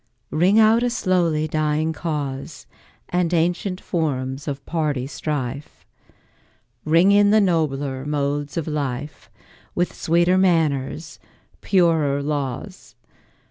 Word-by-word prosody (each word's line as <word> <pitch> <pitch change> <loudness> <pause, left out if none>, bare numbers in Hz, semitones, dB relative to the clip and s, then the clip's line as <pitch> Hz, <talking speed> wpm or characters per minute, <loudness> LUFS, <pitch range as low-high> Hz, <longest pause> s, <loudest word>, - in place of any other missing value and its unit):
Ring 180 +7 +3
out 220 +1 +5
a 245 - +1
slowly 175 -9 +1
dying 155 +1 0
cause, 145 -2 -5 0.4
And 175 -1 0
ancient 180 +3 0
forms 140 -7 -3
of 140 -1 -5
party 150 -6 -1
strife; 140 -1 -5 1.0
Ring 165 +5 +4
in 205 0 +5
the 215 +1 +5
nobler 145 -8 0
modes 145 0 -2
of 165 - -2
life, 145 -1 -4 0.5
With 175 0 0
sweeter 175 +3 +2
manners, 160 -5 0 0.4
purer 160 -7 +2
laws. 145 +5 -4
155 Hz, 105 wpm, -22 LUFS, 140-175 Hz, 1.0 s, out